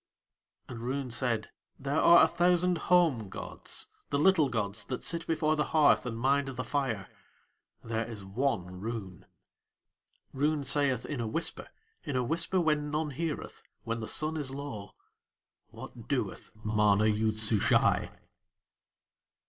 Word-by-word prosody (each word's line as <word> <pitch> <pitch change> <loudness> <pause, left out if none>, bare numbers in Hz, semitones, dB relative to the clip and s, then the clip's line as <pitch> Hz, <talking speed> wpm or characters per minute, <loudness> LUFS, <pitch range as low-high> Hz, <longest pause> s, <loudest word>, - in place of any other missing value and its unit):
And 120 -3 -7
Roon 130 +2 -3
said: 115 -3 -1 0.3
"There 140 +3 -1
are 170 0 +8
a - - +6
thousand 180 0 +2
home 160 - +3
gods, - - -6 0.2
the 140 - 0
little 160 -2 +4
gods 110 -2 -2
that 125 - -5
sit 170 -1 -2
before 155 -1 +1
the 150 - 0
hearth 150 -4 +5
and 115 -2 -4
mind 135 +3 +2
the 130 -1 -4
fire 120 -6 -2 0.8
there 115 0 -2
is 105 -4 -8
one 95 -4 -2
Roon." 105 -4 -6 1.1
Roon 145 +2 0
saith 135 -4 +2
in 145 -4 -4
a 115 - -2
whisper, 165 +10 -2 0.4
in 145 -4 -4
a 125 - +1
whisper 165 +7 0
when 150 -3 +1
none 150 0 -1
heareth, 155 +3 -4 0.2
when 115 0 -3
the 110 - -5
sun 155 +1 -1
is 145 -3 -2
low: 135 -7 -7 0.7
"What - - -11
doeth - - -2
MANA 105 -1 +3
YOOD 110 0 +1
SUSHAI?" 110 -1 +3
130 Hz, 140 wpm, -30 LUFS, 110-150 Hz, 1.1 s, are